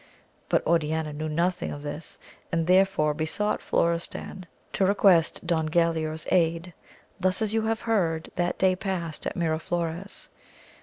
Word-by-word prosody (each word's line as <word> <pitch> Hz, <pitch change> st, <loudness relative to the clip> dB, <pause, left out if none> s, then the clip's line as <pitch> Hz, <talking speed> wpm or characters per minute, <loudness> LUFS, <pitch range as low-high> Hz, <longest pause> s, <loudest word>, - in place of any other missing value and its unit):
But -, -, +2 dB
Oriana 160 Hz, -1 st, +1 dB
knew 155 Hz, +1 st, -4 dB
nothing 175 Hz, +4 st, 0 dB
of 145 Hz, -, -7 dB
this 150 Hz, +2 st, -6 dB, 0.3 s
and 165 Hz, -1 st, +1 dB
therefore 185 Hz, -4 st, +3 dB
besought 160 Hz, +8 st, -1 dB
Elorestan 170 Hz, +2 st, -1 dB, 0.3 s
to 195 Hz, -, +1 dB
request 190 Hz, -4 st, +4 dB
Don 160 Hz, -2 st, +1 dB
Gulaor's 160 Hz, -1 st, +1 dB
aid. 170 Hz, 0 st, +1 dB, 0.5 s
Thus 185 Hz, 0 st, +1 dB
as 215 Hz, -1 st, -1 dB
you 225 Hz, -, +2 dB
have 225 Hz, 0 st, -1 dB
heard, 175 Hz, -8 st, 0 dB
that 175 Hz, 0 st, 0 dB
day 190 Hz, -1 st, +3 dB
passed 180 Hz, -5 st, -3 dB
at -, -, -4 dB
Miraflores. 170 Hz, +2 st, -2 dB
170 Hz, 140 wpm, -26 LUFS, 160-185 Hz, 0.5 s, request